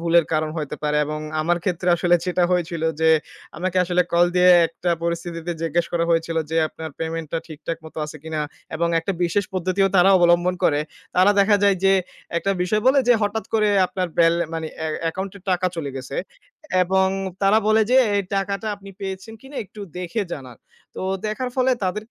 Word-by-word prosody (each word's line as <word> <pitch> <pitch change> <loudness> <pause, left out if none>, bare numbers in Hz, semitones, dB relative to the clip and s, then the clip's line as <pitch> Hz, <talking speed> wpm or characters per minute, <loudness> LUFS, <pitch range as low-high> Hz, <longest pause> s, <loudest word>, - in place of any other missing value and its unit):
ভুলের 170 -1 +4
কারণ 155 0 0
হতে 150 -1 -4
পারে 150 0 0
এবং 155 +1 -4 0.2
আমার 170 +2 +1
ক্ষেত্রে 180 -1 -1
আসলে 175 0 +3
যেটা 180 0 0
হয়েছিল 170 -2 -1 0.2
যে 160 0 +5 0.5
আমাকে 185 +1 -2
আসলে 180 0 +2
কল 170 +1 +5
দিয়ে 180 0 +6 0.2
একটা 175 +1 -3
পরিস্থিতিতে 170 0 -3
জিজ্ঞেস 165 +1 0
করা 170 -1 +1
হয়েছিল 165 0 +1
যে, 160 - -1
"আপনার 160 0 -8
পেমেন্টটা 165 -1 -3
ঠিকঠাক 160 +1 -6
মত 160 - -11
আছে 155 - -9
কিনা?" 160 -1 -3 0.3
এবং 170 +1 0
একটা 165 +4 -2
বিশেষ 200 +4 +1
পদ্ধতিও 185 +2 +1
তারা 190 +2 +6
অবলম্বন 175 +1 +3
করে। 145 -1 +3 0.4
তারা 185 +3 +6
দেখা 200 +1 +4
যায় 200 -1 +4
যে 195 - +6 0.5
একটা 195 - -1
বিষয় 210 +4 +1
বলে 265 +2 +5
যে, - - +8
"হঠাৎ 205 +2 -1
করে 215 -1 +3 0.2
আপনার 180 -1 -3
বেল 165 0 +5 0.2
মানে 160 -1 -3 0.2
এ - - 0 0.2
অ্যাকাউন্টে 190 +4 -3
টাকা 185 0 +1
চলে 150 -4 -3
গেছে" 135 +1 -6 0.7
এবং 190 +1 +2 0.4
তারা 200 +3 +5
বলে 220 0 +5
যে, 255 - +5 0.2
"এই 200 - +1
টাকাটা 200 +2 -2
আপনি 200 0 -12
পেয়েছেন 190 +3 -6
কিনা, 270 +3 -12
একটু 210 +2 -13 0.2
দেখে 180 +5 -2
জানান।" 130 -5 -11 0.4
তো - - -4 0.2
দেখার 250 +4 -3
ফলে 260 0 +3
তাদেরকে 210 +5 -3
175 Hz, 185 wpm, -22 LUFS, 165-195 Hz, 0.7 s, যে